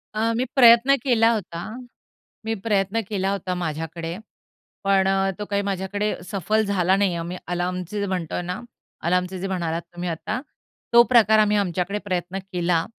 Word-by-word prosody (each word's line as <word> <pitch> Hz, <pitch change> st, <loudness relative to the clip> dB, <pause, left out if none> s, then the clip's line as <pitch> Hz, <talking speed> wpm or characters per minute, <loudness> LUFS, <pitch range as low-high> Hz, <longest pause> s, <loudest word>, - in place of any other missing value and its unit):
अ, 225 Hz, +1 st, +1 dB
मी 250 Hz, -, +1 dB
प्रयत्न 245 Hz, +1 st, +7 dB
केला 230 Hz, -4 st, +4 dB
होता, 185 Hz, -6 st, -4 dB, 0.9 s
मी 225 Hz, -, 0 dB
प्रयत्न 205 Hz, +1 st, +1 dB
केला 195 Hz, -2 st, 0 dB
होता 190 Hz, -2 st, -2 dB
माझ्याकडे, 165 Hz, 0 st, -4 dB, 0.7 s
पण 195 Hz, -1 st, +3 dB
अ, 195 Hz, 0 st, +2 dB
तो 210 Hz, -, -3 dB
काही 200 Hz, 0 st, +1 dB
माझ्याकडे 200 Hz, +2 st, -1 dB, 0.2 s
सफल 210 Hz, +3 st, +1 dB
झाला 190 Hz, -2 st, +2 dB
नाही 200 Hz, 0 st, +2 dB
आहे. 175 Hz, -, -3 dB
आम्ही 175 Hz, +2 st, -5 dB
अलार्मचे 180 Hz, +2 st, -3 dB
जे 200 Hz, -, 0 dB
म्हणतोय 180 Hz, -3 st, -2 dB
ना, 180 Hz, +3 st, -4 dB, 0.4 s
अलार्मचे 180 Hz, +2 st, 0 dB
जे 195 Hz, -, -3 dB
म्हणालात 170 Hz, -3 st, -2 dB
तुम्ही 175 Hz, +1 st, -4 dB
आता, 165 Hz, +8 st, -3 dB, 0.5 s
तो 235 Hz, -, +9 dB
प्रकार 220 Hz, -2 st, +6 dB
आम्ही 210 Hz, 0 st, +3 dB
आमच्याकडे 190 Hz, +1 st, -1 dB
प्रयत्न 185 Hz, -1 st, -2 dB
केला. 175 Hz, -2 st, +1 dB
190 Hz, 160 wpm, -23 LUFS, 175-210 Hz, 0.9 s, तो